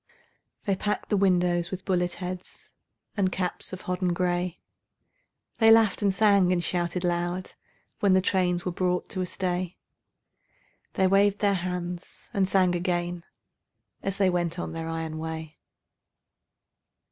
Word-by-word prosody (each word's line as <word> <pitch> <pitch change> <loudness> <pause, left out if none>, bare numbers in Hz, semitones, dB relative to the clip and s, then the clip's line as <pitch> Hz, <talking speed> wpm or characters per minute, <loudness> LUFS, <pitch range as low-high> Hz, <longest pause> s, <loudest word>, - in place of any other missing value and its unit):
They 200 -3 +2
packed 210 +2 -2
the 210 - +2
windows 180 -3 +2
with 190 -1 -6
bullet 180 -2 +1
heads 180 0 -7 0.4
And 190 -3 +1
caps 180 -1 -3
of 185 - -6
hodden 180 -1 -1
gray; 180 0 -1 1.0
They 225 -1 +6
laughed 225 -2 +5
and 200 -1 +3
sang 200 -2 +4
and 175 -1 +1
shouted 175 0 -1
loud 175 +1 -1 0.5
When 200 -2 +4
the 190 - +6
trains 180 -2 +1
were 180 - 0
brought 180 0 -1
to 185 - -3
a 180 - -2
stay; 180 -1 -2 1.2
They 190 - +2
waved 200 +1 +4
their 205 -1 +2
hands 180 -1 -5
and 195 -2 +1
sang 185 -2 +3
again 175 -1 -2 0.8
As 195 0 -2
they 195 -2 +3
went 175 -1 -1
on 175 - -4
their 165 0 -4
iron 160 -1 -4
way. 160 -1 -6
180 Hz, 145 wpm, -27 LUFS, 175-190 Hz, 1.2 s, They